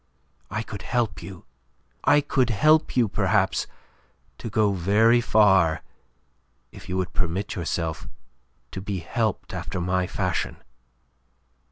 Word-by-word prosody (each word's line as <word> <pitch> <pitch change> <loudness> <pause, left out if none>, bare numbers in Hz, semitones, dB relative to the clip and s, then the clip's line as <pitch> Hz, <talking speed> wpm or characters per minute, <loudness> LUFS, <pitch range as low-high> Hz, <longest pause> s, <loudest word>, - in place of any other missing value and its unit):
I 110 +4 -3
could 100 -3 -8
help 120 +2 -1
you; 90 0 -10 0.6
I 150 - +5
could 130 -3 +1
help 155 +6 +3
you, 120 -3 +4
perhaps, 95 - +1 0.7
to 115 - -5
go 105 -1 +2
very 105 +6 +4
far 95 -8 +4 0.9
if - - -13
you 90 - -1
would 90 -2 -2
permit 95 +3 -2
yourself 80 -3 -3 0.6
to 95 - -6
be 100 0 -3
helped 105 +4 -2
after 95 - -4
my 90 +1 0
fashion." 90 -2 -2
100 Hz, 125 wpm, -25 LUFS, 90-115 Hz, 0.9 s, I